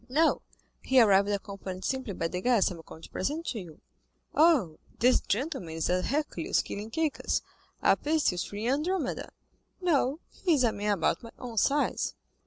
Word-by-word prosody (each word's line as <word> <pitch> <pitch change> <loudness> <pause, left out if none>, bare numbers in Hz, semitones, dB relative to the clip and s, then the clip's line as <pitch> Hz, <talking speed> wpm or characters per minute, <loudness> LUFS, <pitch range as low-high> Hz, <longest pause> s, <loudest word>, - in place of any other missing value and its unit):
"No, 310 +5 +3 0.4
he 265 0 +4
arrived 200 -3 +5
accompanied 195 -2 -4
simply 260 -6 -2
by 165 - -1
the 180 +2 -4
guest 235 -5 +3
I - - -6
am 165 - -10
going 160 - -13
to - - -10
present 305 - -2
to 230 - -3
you." 170 -3 -11 0.5
"Ah, 310 - +5 0.3
this 250 +2 +4
gentleman 225 - -2
is 165 +1 0
a 180 0 +2
Hercules 295 +8 0
killing 210 +2 -6
Cacus, 315 +4 -1 0.4
a - - +6
Perseus 295 - 0
freeing 210 +3 -4
Andromeda." 305 +1 -1 0.5
"No, 300 -5 +1
he 350 -4 +1
is 265 - +2
a 235 - +4
man 205 0 0
about 170 -5 0
my 230 - -9
own 235 -4 -3
size." 290 +6 +1
235 Hz, 175 wpm, -29 LUFS, 195-295 Hz, 0.5 s, a